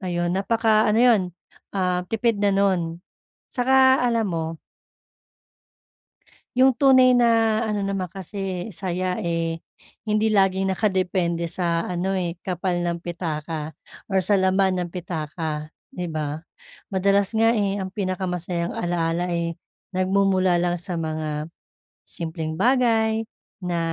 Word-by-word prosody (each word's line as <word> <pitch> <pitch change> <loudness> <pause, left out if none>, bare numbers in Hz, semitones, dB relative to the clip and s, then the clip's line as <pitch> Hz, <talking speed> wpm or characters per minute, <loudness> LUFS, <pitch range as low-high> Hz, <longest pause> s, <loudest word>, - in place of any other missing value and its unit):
Ayon, 175 -2 -1
napaka-ano 215 +2 +2
'yon, 235 -5 +5 0.5
ah, 180 -1 +1
tipid 225 -1 0
na 205 - +3
no'n. 185 -4 +1 0.6
Saka 260 +1 +4
alam 235 -3 +1
mo 165 -1 -3 2.0
'yong 260 +2 +5
tunay 255 -2 +6
na 225 -2 +3
ano 210 -2 -1
naman 195 -2 -1
kasi 190 0 -5
saya, 185 -1 -2
eh, 165 -1 -1 0.5
hindi 215 +1 +2
laging 195 -2 +2
nakadepende 185 -4 0
sa 170 -2 0
ano, 180 +2 -1
eh, 175 -2 -2
kapal 180 0 -1
ng 170 0 -2
pitaka 160 -3 -4 0.3
or 190 -2 +1
sa 200 +2 +2
laman 190 0 +2
ng 175 -1 -2
pitaka, 155 -3 -4 0.2
'di 180 -1 -5
ba? 155 +1 -4 0.5
Madalas 195 +2 +2
nga, 225 +1 +4
eh, 200 -1 0
ang 190 - -4
pinakamasayang 180 -3 -2
alaala, 175 0 -1
eh, 170 -1 -2 0.4
nagmumula 185 -2 +2
lang 175 0 0
sa 175 +1 -5
mga 155 -1 -3 0.6
simpleng 160 -1 -4
bagay, 225 0 +2 0.3
na 175 -2 -2
185 Hz, 120 wpm, -23 LUFS, 170-205 Hz, 2.0 s, tunay